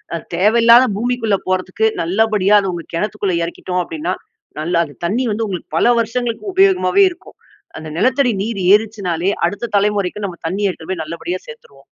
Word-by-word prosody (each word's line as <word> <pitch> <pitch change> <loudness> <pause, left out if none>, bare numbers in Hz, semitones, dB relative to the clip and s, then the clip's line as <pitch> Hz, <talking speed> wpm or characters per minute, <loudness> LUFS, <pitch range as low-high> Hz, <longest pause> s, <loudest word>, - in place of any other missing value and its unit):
அது 165 - -5
தேவையில்லாத 230 +5 +6
பூமிக்குள்ள 230 -3 0
போறதுக்கு, 185 +3 0 0.2
நல்லபடியா, 205 +3 +2
அது 190 -2 -2
உங்க 170 -1 -6
கெணத்துக்குள்ள 200 -1 -1
எறக்கிட்டோம் 180 +1 -3
அப்டின்னா, 320 -2 -4 0.5
நல்லா 170 +2 0
அந்த 145 -3 -14
தண்ணீ 240 +9 0
வந்து, 225 +1 -2
உங்களுக்கு 180 -4 -6
பல 170 - +3
வருஷங்களுக்கு 235 - -3
உபயோகமாவே 385 +1 +4
இருக்கும். - - -15 0.4
அந்த 155 0 -8
நிலத்தடி 255 +2 +2
நீர் 215 -3 -3
ஏறிச்சுன்னாலே, 200 -4 0 0.2
அடுத்த 215 +3 -5
தலைமுறைக்கு, 205 0 0
நம்ம 175 -3 -9
தண்ணீ 195 +5 -2
எடுத்துட்டு 175 -1 -7
போயி 175 -4 -3
நல்லபடியா 170 +3 -5
சேத்துருவோம். 140 -2 -14
205 Hz, 155 wpm, -18 LUFS, 180-230 Hz, 0.5 s, தேவையில்லாத